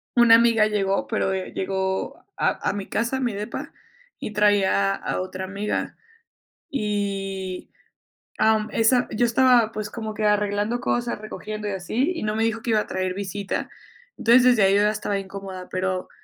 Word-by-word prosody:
una 240 -2 +7
amiga 230 -2 +4
llegó, 195 -2 0
pero, 195 - 0
eh, 190 -1 -4
llegó 190 0 -2
a - - +1
a - - -1
mi 200 -1 -5
casa, 235 +4 -1
mi 245 -4 -1
depa, 205 +1 -6 0.5
y - - -5
traía 200 - +3
a - - -3
otra 185 0 -5
amiga. 200 +2 -3 0.7
Y 195 -5 -3 0.7
am, 220 -1 +3
esa 245 +2 +3
yo 240 +3 +2
estaba, 240 -1 +4
pues, 215 -1 -5
como 220 -1 -5
que 215 0 -2
arreglando 210 +3 +1
cosas, 240 -1 -1
recogiendo 215 0 -6
y - - -2
así, 220 - -1
y 335 - -5
no 210 0 -1
me 225 - +1
dijo 225 0 -1
que 235 - -2
iba 220 - +4
a - - -7
traer 185 -1 -2
visita. 200 +1 -4 0.5
Entonces, 240 +2 +5
desde 245 -5 +5
ahí 195 +1 +4
yo 205 - +4
ya 210 - +4
estaba 205 -1 -2
incómoda, 190 -1 -8
pero 185 0 -2
210 Hz, 175 wpm, -24 LUFS, 195-225 Hz, 0.7 s, una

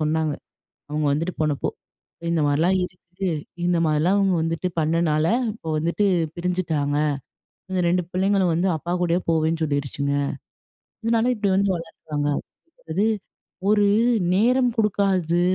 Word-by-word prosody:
சொன்னாங்க, 155 0 +1 0.6
அவங்க 150 0 -1
வந்துட்டு 165 +5 -1
போனப்போ. 150 -2 0 0.6
இந்த 165 -2 +1
மாரிலாம் 165 +6 +2
இருக்கு. 180 -1 -11 0.6
இந்த 175 0 +2
மாதிரிலாம் 155 +6 +2
அவங்க 195 -2 +3
வந்துட்டு 165 +2 -1
பண்ணனால, 155 0 +2 0.3
இப்போ 165 -8 -9
வந்துட்டு 170 +6 0 0.3
பிரிஞ்சிட்டாங்க. 165 -5 -1 0.8
இந்த 185 - 0
2 180 +1 +2
பிள்ளைங்களும் 190 -2 +2
வந்து 175 +4 +1
அப்பா 170 +3 -5
கூடயே 175 0 +2
போவேன்னு 160 0 +1
சொல்லிடுச்சுங்க. 140 -1 -1 0.9
இதனால 230 +2 +2
இப்படி 205 -2 0
வந்து 195 -1 +2
வளர்க்கறாங்க. 155 -3 -4 0.6
அதாவது, 170 +6 0 0.6
ஒரு 205 -1 +4 0.5
நேரம் 245 +5 +3
குடுக்காதது, 190 -5 +2
170 Hz, 120 wpm, -23 LUFS, 155-190 Hz, 0.9 s, ஒரு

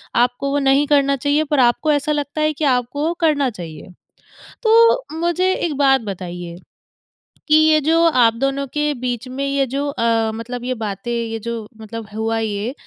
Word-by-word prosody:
आपको 245 +3 +1
वो 285 - +1
नहीं 275 +1 +3
करना 280 -1 +3
चाहिए 290 +3 +1
पर 295 - +2
आपको 250 +5 +3
ऐसा 290 0 0
लगता 295 +1 -2
है 305 0 +1
कि 300 - -6
आपको 255 +2 0
वो 335 - 0
करना 290 -5 +2
चाहिए। 170 -6 -9 0.7
तो 460 -4 +4
मुझे 350 +2 +1
एक 335 -4 -2
बात 270 -2 +4
बताइए 175 -4 -7 0.9
कि 305 - +5
ये 310 0 +5
जो 325 +3 +2
आप 245 -7 +4
दोनों 275 +3 -1
के 295 0 0
बीच 245 -1 -3
में 270 +2 -4
ये 275 -1 +1
जो 280 +3 -2
अ, 230 -4 0
मतलब 240 +2 -6
ये 255 - -1
बातें 215 -1 -5
ये 230 -1 -3
जो 230 -1 -5
मतलब 220 0 -8
हुआ 225 +1 -1
ये 215 +2 -3
270 Hz, 180 wpm, -19 LUFS, 230-295 Hz, 0.9 s, कि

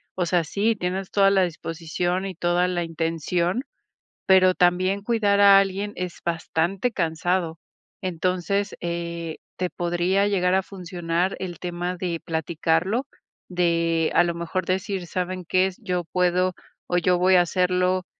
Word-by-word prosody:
o 180 - 0
sea, 175 0 +2
sí, 205 +8 0
tienes 185 0 -3
toda 195 -1 +4
la 195 -1 +3
disposición 175 +2 -2
y 190 -2 -5
toda 175 +1 +1
la 175 -1 -1
intención, 165 - -1 0.6
pero 185 -1 +6
también 185 +3 +2
cuidar 205 -3 +2
a 200 -1 +8
alguien 195 +1 -1
es 180 -1 -5
bastante 170 +6 -1
cansado, 170 -2 -1 0.4
entonces, 185 +2 -1
eh, 170 -1 -4 0.2
te 180 -1 -1
podría 175 +3 0
llegar 185 -2 +2
a 190 - +2
funcionar 180 -1 -2
el 180 -3 -6
tema 175 0 -3
de 175 -2 -3
platicarlo, 165 - 0 0.4
de 170 -2 +1
a - - +6
lo 170 -1 -1
mejor 170 +2 -3
decir, 190 0 -2
¿saben 185 +1 -3
qué? 185 +2 +2
Yo 180 -5 -3
puedo, 180 +1 +1 0.3
o 175 - +1
yo 180 +1 +3
voy 185 +1 +4
a 180 - +7
hacerlo, 180 +1 +1
180 Hz, 145 wpm, -24 LUFS, 170-190 Hz, 0.6 s, a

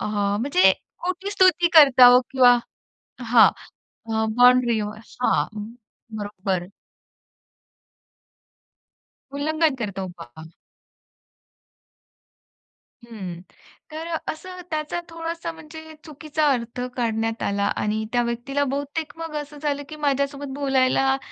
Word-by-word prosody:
अ, - - -3
म्हणजे 205 -1 +2 0.3
खोटी 370 +3 -3
स्तुती 370 -3 +4
करत 280 -5 +7
आहोत 250 +1 +8
किंवा 250 -2 +5 0.6
हां. 230 -1 +6 0.9
बाउंडरी 245 -2 +5
हां, 215 +4 -2 0.7
बरोबर. 195 -3 -3 2.7
उल्लंघन 310 0 +1
करतो 195 -4 -4
बा. 160 +2 -12 2.6
हं. 190 -7 -8 0.5
तर 320 +2 -6
अ, 330 -1 -2
असं 365 +3 -10
त्याचा 310 +2 -2
थोडासा 330 0 -5
म्हणजे 315 0 -12
चुकीचा 305 0 -2
अर्थ 245 0 -4
काढण्यात 225 -1 -2
आला 200 0 0
आणि 215 +1 -2
त्या 240 0 +2
व्यक्तीला 240 +4 -2
बहुतेक 290 +2 -4
मग 325 -2 -6
असं 295 0 -12
झालं, 285 -1 -2
की 310 - -8
माझ्यासोबत 280 -1 -1
बोलायला 270 -1 +2
270 Hz, 100 wpm, -23 LUFS, 225-310 Hz, 2.7 s, आहोत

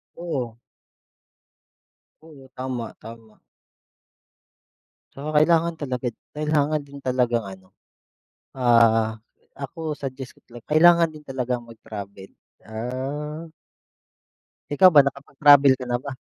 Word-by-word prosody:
Oo. 130 -10 -5 1.6
Oo 145 -5 -15
tama, 130 -2 -5
tama. 115 -1 -13 1.7
So 150 +3 -6
kailangan 165 +2 +3
talaga 130 -5 -4 0.3
kailangan 150 0 +1
din 140 0 -12
talagang 125 -2 0
ano 95 -2 -12 0.9
ah, 115 -2 +3 0.3
ako 150 +3 -5
suggest 130 -2 -7
to - - -27
talaga 120 -1 -13
kailangan 170 +1 +6
din 155 - -12
talagang 125 -2 -3
mag-travel, 105 -4 -10 0.4
ah. 135 +8 -5 1.3
Ikaw 185 +6 +7
ba 145 - +9
nakapag-travel 140 0 +4
ka 125 - -5
na 120 - +1
ba? 140 +2 -7
130 Hz, 100 wpm, -23 LUFS, 115-150 Hz, 1.7 s, ba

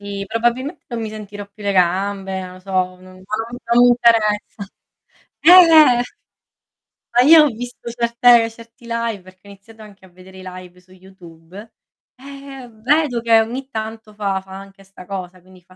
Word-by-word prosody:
Sì, 200 -1 -6
probabilmente 240 - -2
non 235 -2 -5
mi 220 - -4
sentirò 205 -1 -9
più 205 +1 -17
le 200 - -1
gambe, 190 +1 -1
non 185 0 -9
lo 185 - -13
so, 195 +1 -13
ma 185 0 -1
non 185 0 -16
non 235 +3 -1
mi - - +6
interessa. 220 -4 +1 0.8
Eh, 325 - +4 0.5
eh. - - +2 1.1
Ma 245 - +4
io 315 +2 +7
ho 300 - +3
visto 245 0 -8
certe 235 0 +3
certi 230 +1 -17
live 230 -3 -3
perché 185 +2 -19
ho - - -12
iniziato 215 +3 -16
anche 200 -2 -17
a - - -19
vedere 185 +1 -16
i - - -11
live 180 -1 -11
su 185 +1 -27
YouTube, 185 +2 -15 0.4
e, 255 - -21
ehm, 270 -5 -12
vedo 280 -2 +1
che 230 -1 +4
ogni 260 +4 -6
tanto 220 -2 -7
fa 195 -2 -2
fa 190 - -18
anche 195 0 -14
sta 190 -1 -15
cosa 185 -2 -7
quindi 185 0 -20
fa 185 +1 -23
210 Hz, 185 wpm, -18 LUFS, 190-235 Hz, 1.1 s, io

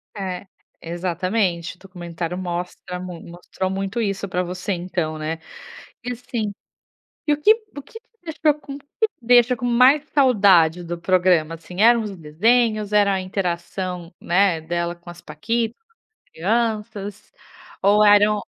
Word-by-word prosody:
É. 190 -1 -5 0.3
Exatamente, 175 +1 -2
o - - -31
documentário 175 -2 -6
mostra 180 0 -5
mui 180 -2 -7
mostrou 175 +2 -5
muito 195 +4 -3
isso 200 -3 -2
pra 180 0 -1
você 180 +2 -4
então, 175 -3 -2
né. 160 +1 -4 0.6
E 245 - -3
assim, 230 -3 -4 0.7
e - - +3
o 295 - -4
que 430 +7 +7 0.2
o - - -4
que 365 - -12 0.3
deixou 315 -2 +1
com 280 - -8
o - - -9
que 285 - -27 0.2
te 435 - -58
deixa 245 +1 +5
com 245 - -4
mais 255 +5 +5
saudade 195 - +4
do 175 0 -5
programa, 175 -3 +2
assim? 170 +3 -11
Eram 235 +1 +6
os 205 -2 -6
desenhos, 215 +7 +1
era 200 -2 +3
interação, 180 -1 -4
né, 180 -1 +2
dela 170 +1 -2
com 175 0 -14
as 175 0 -11
paquitas, 225 +9 -2
com 455 0 -38 0.2
as - - -78
crianças, 210 +1 -2 0.5
ou 205 +2 +5
eram 205 0 +5
190 Hz, 150 wpm, -22 LUFS, 175-225 Hz, 0.7 s, que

